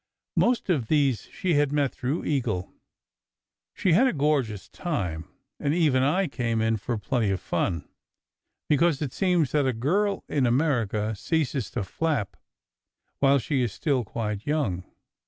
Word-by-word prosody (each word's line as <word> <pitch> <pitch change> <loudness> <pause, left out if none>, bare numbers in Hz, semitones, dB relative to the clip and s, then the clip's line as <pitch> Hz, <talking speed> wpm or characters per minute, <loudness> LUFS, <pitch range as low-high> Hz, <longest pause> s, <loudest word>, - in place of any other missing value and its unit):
Most 245 0 +2
of 145 - +1
these 140 -5 +1
she 180 -2 -1
had 145 -1 +2
met 145 -3 +1
through 135 +6 -2
Eagle. 120 -11 -1 1.0
She 180 - +2
had 245 +10 +5
a - - +1
gorgeous 140 - 0
time, 90 - -3 0.3
and 145 +2 0
even 150 -7 +3
I 160 +9 +2
came 120 -5 -1
in 110 0 +1
for 115 +3 -3
plenty 110 +1 0
of 95 -1 0
fun; 85 -1 -2 0.8
because 150 0 +3
it 135 - -4
seems 180 -7 +2
that 145 -3 +2
a 130 - +1
girl 190 - 0
in 135 -4 +1
America 115 -6 +1
ceases 135 - -1
to - - -3
"flap" 135 - -2 0.8
while 140 0 +5
she 135 +2 0
is 120 -5 -1
still 135 -1 0
quite 105 0 -4
young. 110 - 0
135 Hz, 155 wpm, -26 LUFS, 110-155 Hz, 1.0 s, had